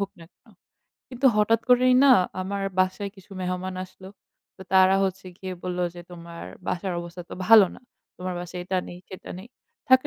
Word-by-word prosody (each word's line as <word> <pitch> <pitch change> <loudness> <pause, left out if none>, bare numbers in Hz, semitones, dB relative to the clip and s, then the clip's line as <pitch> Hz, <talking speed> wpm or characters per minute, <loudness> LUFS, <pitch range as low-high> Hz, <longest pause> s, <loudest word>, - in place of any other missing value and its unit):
হোক 200 0 -2
না - - -11
কেনো। 225 - -25 0.6
কিন্তু 260 +1 0
হঠাৎ 220 +2 +3
করেই 250 +1 +5
না 270 - +8 0.3
আমার 200 +1 -3 0.2
বাসায় 190 +2 0
কিছু 195 +1 -17
মেহমান 185 +1 -3
আসলো, 185 0 -13 0.5
তো 190 - -10
তারা 190 +1 +6
হচ্ছে 190 0 -3
গিয়ে 185 -1 -5
বলল 180 -1 -3 0.2
যে, 175 - -8
তোমার 170 -1 -9 0.2
বাসার 185 +1 -2
অবস্থা 170 +1 -8
তো - - -5
ভালো 220 -3 +9
না। - - -16 0.4
তোমার 180 0 -4
বাসায় 180 0 -6
এটা 185 +1 0
নেই, 175 - -9
সেটা 190 - -10
নেই। 210 +6 -11 0.4
থাকে 260 0 +6
190 Hz, 185 wpm, -25 LUFS, 180-205 Hz, 0.6 s, ভালো